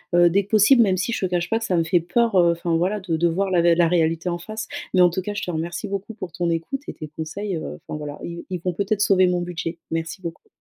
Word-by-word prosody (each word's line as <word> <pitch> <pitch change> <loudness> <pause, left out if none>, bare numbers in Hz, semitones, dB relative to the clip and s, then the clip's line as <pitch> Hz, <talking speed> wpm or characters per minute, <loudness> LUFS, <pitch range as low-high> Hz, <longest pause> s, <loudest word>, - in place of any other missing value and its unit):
heu, 175 0 +6
dès 200 +2 +3
que - - -26
possible. 220 +4 +6
Même 190 -4 +3
si 190 +6 -1
je - - -1
te - - -11
cache 175 -1 0
pas 225 - +2
que 225 - -4
ça 185 -5 +1
me 165 - +3
fait 175 +2 +2
peur, 225 +6 +1
heu, 170 -1 +5
enfin 170 0 -1
voilà 185 +5 +1
de 170 -4 -1
de 170 +2 +3
voir 190 +3 0
la 175 -2 +4
vé 170 0 +4
la 170 -1 +4
réalité 165 0 +1
en 175 0 -2
face, 215 +5 -6 0.3
mais 185 - +6
en 175 -1 +6
tout 185 - -2
cas 205 +2 -5
je - - -3
te 180 - -2
remercie 170 +5 -3
beaucoup 200 +3 -5
pour 185 -5 -7
ton 175 +1 -1
écoute 165 - -2
et - - -5
tes 155 - -7
conseils, 185 +5 -4
heu, 75 - -6
enfin 150 - -4
voilà 145 -1 -6
ils 170 0 -6
ils 180 -2 -3
vont 180 -1 -1
peut-être 205 +3 -1
sauver 190 -3 +4
mon 180 0 +1
budget. 175 -1 -4
Merci 165 +3 -3
beaucoup. 170 0 -7
175 Hz, 300 wpm, -23 LUFS, 170-200 Hz, 0.3 s, heu